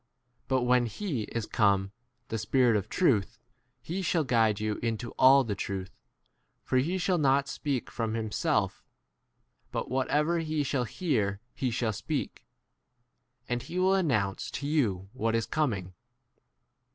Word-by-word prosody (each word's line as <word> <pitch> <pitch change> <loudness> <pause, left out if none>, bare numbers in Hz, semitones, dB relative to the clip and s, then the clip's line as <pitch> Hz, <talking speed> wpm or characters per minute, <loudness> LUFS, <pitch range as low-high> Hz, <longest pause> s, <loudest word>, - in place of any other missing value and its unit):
But 130 -2 +1
when 125 -1 +3
he 135 - -3
is 115 -2 -4
come, 100 -3 +2 0.4
the 115 - -2
Spirit 120 +2 +3
of 100 - -1
truth, 120 - +2 0.5
he 175 +9 -3
shall 175 -3 +1
guide 115 -5 +2
you 105 0 -1
into 115 0 -2
all 135 +1 +6
the 110 -4 -2
truth; 95 -1 -4 0.7
for 130 - 0
he 170 +8 0
shall 180 -1 +1
not 140 -1 +3
speak 140 -2 -3
from 115 -1 -2
himself; 110 -2 -1 0.9
but - - -3
whatever 150 +6 +1
he 155 -2 -1
shall 130 -2 0
hear 110 - -1
he 130 - -1
shall 115 -1 -1
speak; - - -4 1.0
and 120 0 -1
he 175 - -6
will 185 +1 +4
announce 125 - +1
l - - -6
to - - -4
14 140 - -2
you 100 - 0
what 115 -3 0
is 115 - +1
coming. 105 - -1
125 Hz, 150 wpm, -29 LUFS, 110-145 Hz, 1.0 s, all